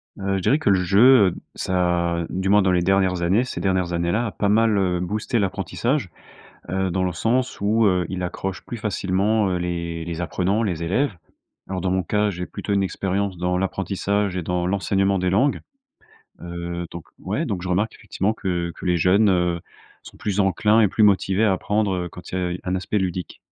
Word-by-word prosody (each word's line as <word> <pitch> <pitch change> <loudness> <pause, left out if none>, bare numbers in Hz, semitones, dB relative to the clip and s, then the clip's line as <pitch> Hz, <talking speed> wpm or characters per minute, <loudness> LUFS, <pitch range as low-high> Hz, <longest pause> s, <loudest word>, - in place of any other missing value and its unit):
Heu, 95 0 -1
je - - -3
dirais 140 - +3
que 130 - +1
le 95 -1 +3
jeu, 105 +3 +6
heu, - - -7 0.2
ça 85 -2 0
du 95 +1 -2
moins 105 +1 +6
dans 95 - +2
les 90 -1 +2
dernières 95 -1 +2
années 95 +8 +3
ces 130 - -5
dernières 95 -2 0
années-là, 85 +8 0
a - - -4
pas 100 - -1
mal, 110 0 +3
heu, 90 -2 +1
boosté 105 +6 -2
l'apprentissage, 100 - -1 0.6
heu, 95 0 -1
dans 95 +1 0
le 90 - -1
sens 125 +8 0
où, 110 +3 +2
heu, 90 -2 +2
il 90 0 -4
accroche 90 0 -4
plus 120 - -6
facilement, 105 0 0
heu, 90 - 0
les 85 -2 -3
les 85 0 -5
apprenants, 95 +5 0
les 90 -7 -2
élèves. 105 +9 0 0.5
Alors, 95 -1 -3
dans 90 +1 -1
mon 95 0 +1
cas, 105 +2 +1
j'ai 90 -1 -5
plutôt 105 - -5
une 100 - +2
expérience 95 0 -2
dans 90 +1 0
l'apprentissage 95 +1 -1
et 90 - -2
dans 90 +1 -1
l'enseignement 95 +1 +1
des 90 0 0
langues. 130 +10 +2 0.8
Heu, 85 0 -5
donc, 85 -2 -8
ouais, - - -2
donc, 90 -3 -3
je 95 - -4
remarque 100 +5 0
effectivement 100 +4 -2
que 85 -4 -2
que - - -11
les 90 -1 +2
jeunes, 100 +5 +4
heu, 90 -2 +1 0.4
sont - - -13
plus 105 -1 -1
enclins 105 +3 +3
et 105 - +4
plus 110 - 0
motivés 100 0 +3
à 105 - +3
apprendre, 105 +1 0
heu, 90 -1 -3
quand 90 - -11
il 95 - -1
y 90 0 -2
a 95 - -7
un 90 - 0
aspect 100 +3 -1
ludique. 90 -2 -3
95 Hz, 210 wpm, -23 LUFS, 90-105 Hz, 0.8 s, jeu